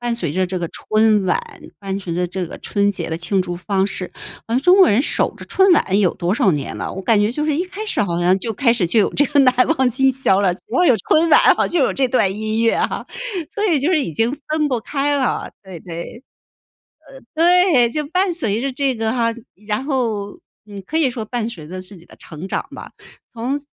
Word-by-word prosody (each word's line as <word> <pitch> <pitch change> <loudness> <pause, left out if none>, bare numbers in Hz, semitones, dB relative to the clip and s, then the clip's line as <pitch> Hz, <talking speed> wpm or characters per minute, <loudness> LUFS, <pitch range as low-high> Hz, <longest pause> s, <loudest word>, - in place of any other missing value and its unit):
伴 240 -1 -1
随 170 -10 -2
着 185 +1 0
这 185 0 -3
个 170 -2 -4
春 215 -2 +1
晚， 175 - +1 0.4
伴 195 -1 -4
随 175 -4 -5
着 180 0 0
这 180 0 -4
个 - - -10
春 205 0 0
节 170 -3 -5
的 160 - -3
庆 185 +3 -1
祝 175 -1 -4
方 195 +1 0
式， 185 -2 -6 0.3
好 225 - -5
像 - - +3
中 360 +6 +5
国 380 -3 +7
人 210 - +3
守 280 - 0
着 - - -12
春 380 -1 +4
晚 200 - +2
有 185 -4 +2
多 180 +3 -1
少 235 -6 +3
年 145 -2 -4
了， - - -5
我 190 - -6
感 210 +2 +2
觉 210 +3 +1
就 300 - -3
是 300 -1 0
一 355 - -1
开 405 +4 -7
始 - - 0
好 175 -3 -2
像 185 +2 +3
就 225 +3 -4
开 235 +2 +2
始 210 -7 +1
就 220 +6 +3
有 - - 0
这 290 - +4
个 285 +1 +2
《难 255 0 +4
忘 260 -1 +3
今 265 +2 +2
宵》 260 -7 +1
了， 185 -3 +3
如 180 - -10 0.2
果 360 - +4
有 260 - +5
春 325 +1 +3
晚 - - +7
好 - - +4
像 - - 0
就 345 - +2
有 260 - +3
这 270 -1 +1
段 220 -6 +2
音 220 +1 -1
乐 230 - +2
哈， - - -2 0.4
所 415 +3 -3
以 325 -9 +2
就 295 - 0
是 310 -6 +2
已 165 - -5
经 225 +8 0 0.2
分 305 -1 +1
不 250 -3 0
开 285 +4 -1
了， 265 -3 -1
对， 185 -4 -10
对。 170 +8 -8 0.9
呃， 265 - -11 0.2
对， 340 -7 +4
就 300 +3 -3
伴 370 +3 +1
随 230 - -1
着 275 0 -2
这 270 -1 -1
个 220 0 -1
哈， 230 -2 0 0.3
然 210 +5 -1
后， 225 -8 -2 0.3
呃， 200 -1 -9
可 315 - -7
以 290 -5 +2
说 235 -3 -5
伴 235 0 -3
随 155 -9 -10
着 185 +2 -7
自 185 +1 -13
己 170 - -18
的 - - -17
成 165 +4 -9
长 - - -3
吧， - - -10 0.4
从 245 +5 -2
自 290 - -14
230 Hz, 270 characters per minute, -19 LUFS, 190-280 Hz, 0.9 s, 国